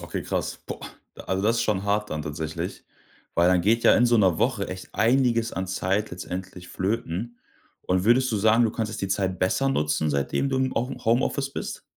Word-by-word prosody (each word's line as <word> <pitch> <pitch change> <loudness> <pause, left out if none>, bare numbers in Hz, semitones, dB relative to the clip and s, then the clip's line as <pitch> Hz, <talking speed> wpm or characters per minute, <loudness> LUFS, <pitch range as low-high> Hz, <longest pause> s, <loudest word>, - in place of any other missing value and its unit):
Okay, - - -5
krass. - - -3
Boah. - - -6 0.5
Also, 95 +1 -1
das 115 +2 +2
ist 115 - +1
schon 105 -4 0
hart 105 +1 0
dann 75 0 -3
tatsächlich. 75 +1 -5 0.5
Weil 85 +1 +4
dann 90 -1 +4
geht 115 +5 +2
ja - - +7
in 120 - +4
so 120 0 +4
'ner 95 -6 +3
Woche 120 -6 0
echt 95 0 -8
einiges 115 0 +2
an 95 0 -3
Zeit 95 +3 -1
letztendlich 90 0 -7
flöten. 110 +3 -3 0.4
Und 90 0 0
würdest 125 +3 +4
du 110 - 0
sagen, 110 +3 +4
du 110 - +1
konntest 110 -1 -4
die 95 - -2
Zeit 95 -2 -1
besser 115 +9 +1
nutzen, 75 - 0
seitdem 70 - 0
du 135 - -1
im 130 0 0
Home 125 +3 -2
Homeoffice 130 +4 +1
bist? - - -5
105 Hz, 200 wpm, -25 LUFS, 90-115 Hz, 0.5 s, ja